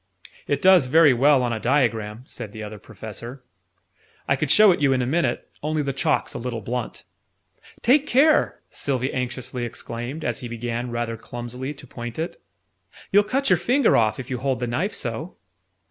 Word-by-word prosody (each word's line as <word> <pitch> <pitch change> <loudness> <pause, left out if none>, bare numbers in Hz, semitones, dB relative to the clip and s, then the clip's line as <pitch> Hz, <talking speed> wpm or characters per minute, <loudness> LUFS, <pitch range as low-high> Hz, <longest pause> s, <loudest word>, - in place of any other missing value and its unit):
"It 145 - -1
does 185 -7 +6
very 155 0 +6
well 135 +2 +4
on 120 -1 0
a 110 - -3
diagram," 115 -3 0
said 105 -5 -8
the 110 - -7
Other 105 0 -8
Professor. 115 +5 -9 0.8
"I 135 - +3
could 145 +1 -2
show 210 +5 +7
it 175 - 0
you 140 -2 +4
in 130 - +1
a - - -1
minute, 130 -2 0
only 155 0 -1
the 140 -1 -2
chalk's 130 - 0
a - - -5
little 120 -1 -4
blunt." 120 +2 -4 0.8
"Take 285 +4 +4
care!" 295 +5 +3
Sylvie 130 -1 -2
anxiously 125 -1 -3
exclaimed, 120 +5 -6
as 120 - -1
he 125 - -6
began, 120 +1 -4
rather 120 -1 -3
clumsily, 125 +5 -6
to 135 - -11
point 120 -2 -7
it. 165 +2 -4 0.7
"You'll 205 +1 +6
cut 260 +3 -1
your 185 - +6
finger 245 - +3
off, 110 -1 +2
if 130 +1 -7
you 125 - -2
hold 130 -1 -1
the 125 - -1
knife 155 - -2
so!" - - -5
125 Hz, 185 wpm, -23 LUFS, 120-150 Hz, 0.8 s, show